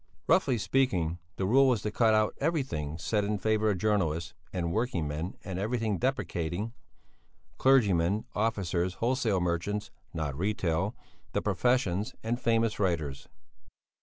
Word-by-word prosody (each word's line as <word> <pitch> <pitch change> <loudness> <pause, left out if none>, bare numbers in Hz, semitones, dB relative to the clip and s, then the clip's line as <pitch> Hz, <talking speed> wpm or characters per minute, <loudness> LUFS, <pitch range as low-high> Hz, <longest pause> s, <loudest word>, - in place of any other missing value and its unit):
Roughly 125 - +3
speaking, 95 -6 +1 0.2
the 95 - -1
rule 135 +7 +5
was 120 -6 +2
to 105 - -1
cut 110 0 +3
out 110 -1 +2
everything 130 - -1
said 105 +5 0
in 105 +1 0
favour 110 +1 +1
of 100 - +1
journalists 85 -5 0 0.2
and 85 -2 -2
working 110 - 0
men 80 +5 -4
and 95 -2 -4
everything 110 -1 -1
depreciating 105 -5 -2 0.9
clergymen, 105 -7 +3
officers, 95 -5 0
wholesale 115 -5 +1
merchants 90 +4 -1 0.2
(not 75 -4 -3
retail), 95 +1 0 0.4
the - - +1
professions, 120 -2 +1
and 120 +2 -2
famous 115 -1 +1
writers. 80 -8 -1
105 Hz, 135 wpm, -29 LUFS, 85-115 Hz, 0.9 s, rule